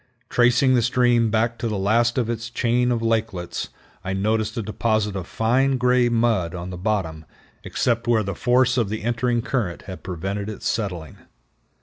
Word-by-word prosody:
Tracing 125 +2 +4
the 125 - +4
stream 120 -1 +3
back 115 +2 0
to 115 - -2
the 105 -2 -2
last 115 +5 +2
of 120 -3 +1
its 120 0 -4
chain 125 +1 +1
of 115 -1 -1
lakelets, 110 -6 -2 0.3
I 95 0 -3
noticed 110 +3 -1
a 115 - -1
deposit 110 0 -1
of 95 -3 -5
fine 130 +4 +1
gray 125 0 +3
mud 115 -7 +1
on 90 +1 -6
the - - -5
bottom 90 -5 -2 0.4
except 120 -1 -1
where 115 -2 +3
the 100 0 -3
force 125 +4 +2
of 115 -5 +1
the 110 0 -4
entering 120 0 0
current 105 -11 -2
had 95 -2 -9
prevented 95 +4 -4
its 105 - -5
settling. 90 - -3
115 Hz, 180 wpm, -23 LUFS, 100-120 Hz, 0.4 s, Tracing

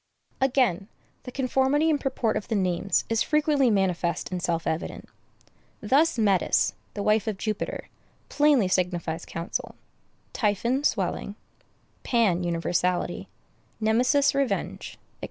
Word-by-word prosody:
Again, 245 -8 +2 0.4
the 250 - -7
conformity 265 +4 +1
and 305 -3 +1
purport 250 -4 -1
of - - -3
the 225 - -1
names 185 0 0
is 225 -1 0
frequently 300 -4 +2
manifest 180 -5 0
and 180 -1 -3
self 165 -1 -1
evident. 160 +2 -4 0.7
Thus 280 +8 +2
Metis, 200 -5 +2 0.2
the 205 - -3
wife 215 0 +2
of 215 -3 -2
Jupiter, 215 +1 -4 0.4
plainly 290 -8 +3
signifies 175 -3 -1
counsel; 165 +1 -5 0.6
Typhon, 235 +5 0
swelling; - - -1 0.7
Pan, 205 -8 +1
universality; 175 +1 -1 0.5
Nemesis, 250 +7 +3
revenge, 275 -2 -2
&c. - - -19
215 Hz, 120 wpm, -26 LUFS, 180-265 Hz, 0.7 s, plainly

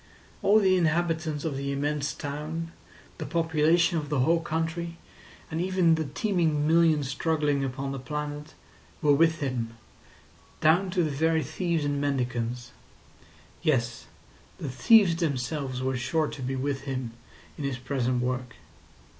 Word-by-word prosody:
All 210 +2 +5
the 190 -2 +4
inhabitants 160 -2 0
of 155 -4 -1
the 140 +1 -3
immense 145 +1 -1
town, 155 +3 -5 0.5
the - - -3
population 165 +1 +2
of 145 -2 -6
the 145 -4 +1
whole 165 +6 +3
country, 165 +1 -3 0.5
and 160 +1 -1
even 185 -2 +3
the 160 -1 0
teeming 160 -1 0
millions 160 -3 +4
struggling 145 0 0
upon 135 +1 -3
the 135 - -4
planet, 150 +3 -5 0.5
were 145 -1 +5
with 160 +2 +3
him—down 135 +7 -2
to 180 -1 +1
the 155 - -1
very 160 +2 +1
thieves 160 +2 -1
and 145 0 -1
mendicants. 125 -3 -2 0.9
Yes, 120 -8 0 0.5
the 145 - -5
thieves 175 - +5
themselves 135 -4 -2
were 130 0 0
sure 135 +6 0
to 150 - -8
be 130 +1 -2
with 135 +1 -2
him 130 -4 -3 0.4
in 150 - -6
his 140 -3 -2
present 125 -1 -1
work. 125 -1 -3
150 Hz, 140 wpm, -27 LUFS, 135-165 Hz, 0.9 s, All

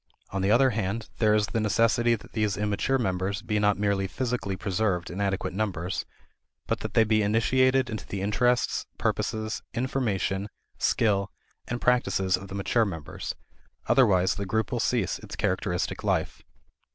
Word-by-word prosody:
On 95 - -2
the 95 - +1
other 130 +4 +5
hand, 110 +1 -2
there 105 -2 +4
is 105 -1 +3
the 105 +2 -2
necessity 115 +2 +3
that 110 - -13
these 105 -3 0
immature 105 +6 +1
members 95 -3 -1
be 105 -1 0
not 105 -1 +3
merely 100 -1 +1
physically 120 -3 -2
preserved 95 -3 -1
in 95 +3 -4
adequate 95 -2 -1
numbers, 95 -3 -2 0.6
but - - -1
that - - -6
they 115 - +6
be 110 0 +2
initiated 130 +5 +3
into 110 -2 -6
the 95 -1 -4
interests, 120 +4 +1
purposes, 110 0 -1
information, 105 -6 -1 0.3
skill, 100 -4 +2 0.4
and 120 - -3
practices 110 -7 +2
of 95 +2 -8
the 95 - -7
mature 105 +4 +2
members: 80 -7 -5 0.5
otherwise 95 -8 +4
the 100 -1 -4
group 110 +1 0
will 120 - -1
cease 115 -5 0
its - - -9
characteristic - - -1
life. - - -1
105 Hz, 160 wpm, -27 LUFS, 95-115 Hz, 0.6 s, they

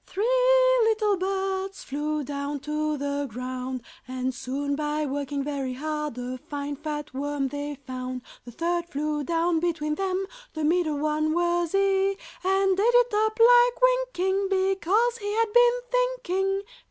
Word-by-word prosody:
Three 405 +3 -2 0.6
little 435 -2 +2
birds 385 +1 -2
Flew 300 +2 -2
down 285 +1 -4
to 300 +1 -1
the 285 0 -2
ground, 255 +1 -5 0.2
And 255 0 -2
soon, 275 +3 -3
by 300 +1 -1
working 280 0 -3
very 275 -3 -3
hard, 300 -1 -3
A 250 +1 -5
fine 285 +2 -5
fat 295 -1 -5
worm 280 0 -2
they 290 +1 -4
found. 255 -1 -5 0.2
The 240 - -10
third 345 +5 -2
flew 300 0 -2
down 335 +2 +1
between 315 -3 -1
them, 380 +2 -1 0.3
(The 315 - -2
middle 315 -1 +2
one 310 +1 0
was 345 -1 +1
he,) 390 0 +2 0.3
And 385 0 +2
ate - - +3
it 485 0 +4
up 435 +1 +1
like 485 +1 +6
winking - - +2
Because 390 +5 +1
he 410 -1 -3
had 450 -1 +1
been 485 0 +5
thinking. 395 -6 0
315 Hz, 150 wpm, -26 LUFS, 285-390 Hz, 0.6 s, like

